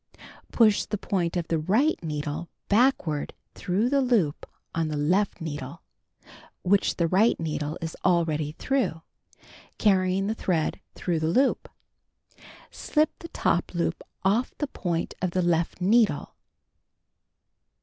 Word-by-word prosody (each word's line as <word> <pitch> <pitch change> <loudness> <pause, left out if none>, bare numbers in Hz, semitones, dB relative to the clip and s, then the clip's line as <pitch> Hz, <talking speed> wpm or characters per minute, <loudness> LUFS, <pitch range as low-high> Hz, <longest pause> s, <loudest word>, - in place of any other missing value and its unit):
Push 215 -3 +4
the 210 - -2
point 180 -3 -1
of 170 -2 -2
the 165 - 0
right 215 - +1
needle 150 +1 -4 0.2
backward 205 - +2 0.2
through 195 +6 0
the 275 +2 +2
loop 220 - +1 0.2
on 165 -1 0
the 155 -1 -3
left 180 +8 +1
needle 145 -1 -6 0.8
(which 195 +2 +2
the 170 - +1
right 195 +7 +3
needle 155 -2 -3
is 165 -1 -4
already 160 -4 +1
through) 245 -9 -1 0.7
carr3dng 190 -2 +2
the 215 - 0
thread 175 -7 -1 0.2
through 170 -3 -1
the 155 - 0
loop. 260 +12 +2 1.0
Slip 305 0 +1
the 335 - -8
top 175 - -1
loop 170 0 -1 0.2
off 210 +6 +1
the 295 - -1
point 175 - -3
of 185 - +1
the 180 +1 0
left 170 0 0
needle. 205 -4 +2
180 Hz, 130 wpm, -26 LUFS, 160-210 Hz, 1.0 s, Push